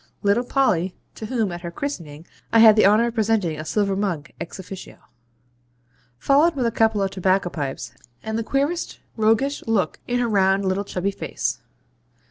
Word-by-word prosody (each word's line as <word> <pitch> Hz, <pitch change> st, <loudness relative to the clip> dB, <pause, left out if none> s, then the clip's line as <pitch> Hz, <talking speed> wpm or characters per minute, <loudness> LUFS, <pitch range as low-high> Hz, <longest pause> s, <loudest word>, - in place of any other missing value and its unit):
Little 205 Hz, +4 st, +3 dB
Polly 190 Hz, -9 st, +1 dB, 0.2 s
(to 220 Hz, -, -7 dB
whom, 225 Hz, -5 st, -1 dB
at 175 Hz, 0 st, -6 dB
her 170 Hz, -, -5 dB
christening, 170 Hz, -, -6 dB, 0.3 s
I -, -, +4 dB
had 220 Hz, -1 st, +8 dB
the 215 Hz, -, +6 dB
honour 215 Hz, +3 st, +4 dB
of -, -, -9 dB
presenting 215 Hz, -8 st, 0 dB
a -, -, -4 dB
silver 195 Hz, +3 st, 0 dB
mug 175 Hz, -6 st, -2 dB
EX 170 Hz, -, -6 dB
OFFICIO) 190 Hz, 0 st, -9 dB, 1.2 s
followed 290 Hz, -, +3 dB
with 255 Hz, -3 st, 0 dB
a 230 Hz, -, +1 dB
couple 220 Hz, -2 st, +2 dB
of 195 Hz, -, -1 dB
tobacco 185 Hz, -1 st, +1 dB
pipes, 135 Hz, -6 st, -5 dB, 0.3 s
and 220 Hz, 0 st, -3 dB
the 230 Hz, -, 0 dB
queerest 285 Hz, +8 st, -1 dB, 0.2 s
roguish 225 Hz, +6 st, +1 dB
look 220 Hz, -4 st, 0 dB
in 245 Hz, -, 0 dB
her 245 Hz, -, +1 dB
round 195 Hz, -2 st, +2 dB
little 190 Hz, +2 st, 0 dB
chubby 195 Hz, +1 st, -2 dB
face. -, -, -3 dB
205 Hz, 175 wpm, -22 LUFS, 185-230 Hz, 1.2 s, had